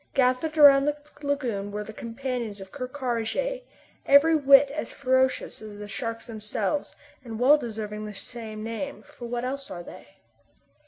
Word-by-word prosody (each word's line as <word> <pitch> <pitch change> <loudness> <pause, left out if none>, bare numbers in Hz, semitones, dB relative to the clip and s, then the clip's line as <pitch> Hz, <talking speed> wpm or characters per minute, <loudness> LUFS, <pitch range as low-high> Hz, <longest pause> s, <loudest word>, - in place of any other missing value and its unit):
Gathered 265 +4 +2
around 280 -2 +8
the 295 0 0 0.2
lagoon 250 -9 -2
were 210 +1 -3
the 220 - -9
companions 235 -2 -4
of 190 0 -10
Ker 255 -3 -5
Karraje, 260 - -2 0.5
every 295 +4 +7
whit 280 -1 +6
as 310 - -4
ferocious 260 -3 +1
as 215 -1 -9
the 205 0 -7
sharks 230 +2 -4
themselves, 215 +4 -3 0.3
and 225 -3 -7
well 265 +4 +7
deserving 215 -3 -5
the 210 - -8
same 220 -1 -7
name, 230 +5 -5
for 240 - -10
what 240 +1 -3
else 275 +2 -4
are 175 -2 -7
they? 180 - -12
245 Hz, 160 wpm, -26 LUFS, 215-275 Hz, 0.5 s, around